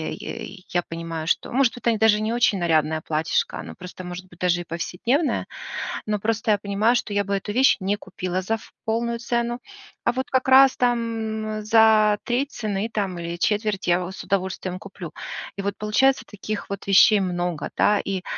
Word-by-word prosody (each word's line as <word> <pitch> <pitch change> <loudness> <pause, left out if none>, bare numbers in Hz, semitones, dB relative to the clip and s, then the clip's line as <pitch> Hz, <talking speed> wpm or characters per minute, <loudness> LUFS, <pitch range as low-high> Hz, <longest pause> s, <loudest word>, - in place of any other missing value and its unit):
и 190 -1 -8
я 175 0 0
понимаю, 165 -1 -5
что, - - 0
может, 255 -1 +2
это 235 -2 +1
даже 215 -1 +4
не 220 +1 -1
очень 235 -4 +2
нарядное 160 -2 +1
платьишко, 155 0 -1
оно - - -8
просто 180 +1 -9
может 180 +1 -7
быть 175 -1 -18
даже 175 -1 +2
и - - -6
повседневное. 230 - -1 0.6
Но 210 0 0
просто 225 +2 -1
я 205 - +2
понимаю, 205 +4 +2
что 230 - -2
я 205 - +2
бы 200 0 -2
эту 200 +2 -4
вещь 260 +5 +5
не 195 +2 0
купила 185 -3 -4
за 220 +5 -1
ф 225 - -8 0.2
полную 235 +1 0
цену, 235 +1 -1 0.4
а - - +4
вот 260 +2 -3
как 260 0 +1
раз 265 0 +7
там 225 -3 -1
за 215 -1 +5
1/3 265 +4 -1
цены 210 -1 -2
там 195 -5 -2
или 170 0 -4
1/4 210 +2 0
я 175 +1 +4
в - - -5
с - - -8
удовольствием 190 -1 -2
куплю. 185 -4 -9 0.5
И - - -2
вот 200 0 -2
получается, 260 +6 +2
таких 205 0 -6
вот 200 -1 -5
вещей 200 +2 +6
много, 175 -3 -2
да. 210 0 +4
И 195 -2 -3
205 Hz, 190 wpm, -24 LUFS, 185-230 Hz, 0.6 s, раз